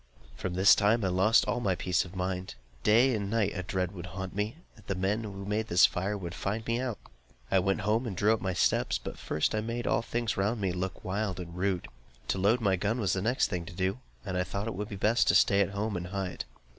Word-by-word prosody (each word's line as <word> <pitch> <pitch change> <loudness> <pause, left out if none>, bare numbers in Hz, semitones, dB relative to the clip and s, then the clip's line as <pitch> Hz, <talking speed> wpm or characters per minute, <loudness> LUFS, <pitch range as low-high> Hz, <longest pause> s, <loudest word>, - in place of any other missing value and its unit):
From 90 - -4
this 95 +2 +7
time 105 +1 +3
I - - +2
lost 95 +5 +4
all 125 - 0
my 100 -6 +1
peace 90 +1 0
of 90 +1 -12
mind. 90 -3 -3 0.3
Day 120 - +5
and 100 -3 -2
night 110 -2 +1
a 90 - -3
dread 90 -1 -2
would 90 -2 -8
haunt 95 0 -6
me, 105 +4 -1 0.2
that 110 -5 -19
the 100 - -1
men 100 +4 0
who 100 -3 -7
had 100 0 -7
made 110 +2 -1
this 90 0 +6
fire 100 +3 -1
would 85 -3 -6
find 105 +5 -3
me 115 +1 0
out. 125 -4 -2 0.5
I 95 - +5
went 95 +3 0
home 110 +5 +1
and 95 -5 -5
drew 105 +4 +4
up 110 - -2
my 95 -1 -1
steps, 65 -8 +2
but - - -8
first 75 - 0
I 110 - 0
made 115 +2 -3
all - - +2
things 115 -1 -2
round 105 +4 0
me 95 -2 0
look 90 +1 -4
wild 95 0 -2
and 85 -1 -7
rude. 95 -1 -1 0.4
To 95 - 0
load 110 +6 +3
my 95 -3 +2
gun 105 +6 -1
was 100 -6 +1
the 95 - -1
next 120 +6 +1
thing 90 -3 -2
to - - -9
do, 95 +5 -1 0.3
and 95 -2 -2
I - - +2
thought 100 +3 -4
it 115 - -3
would 105 +2 -5
be 100 - -5
best 110 +3 +2
to - - +4
stay 100 0 +5
at 100 - +2
home 100 +1 -2
and 90 0 -4
hide. 95 -1 -4
100 Hz, 260 wpm, -29 LUFS, 95-110 Hz, 0.5 s, this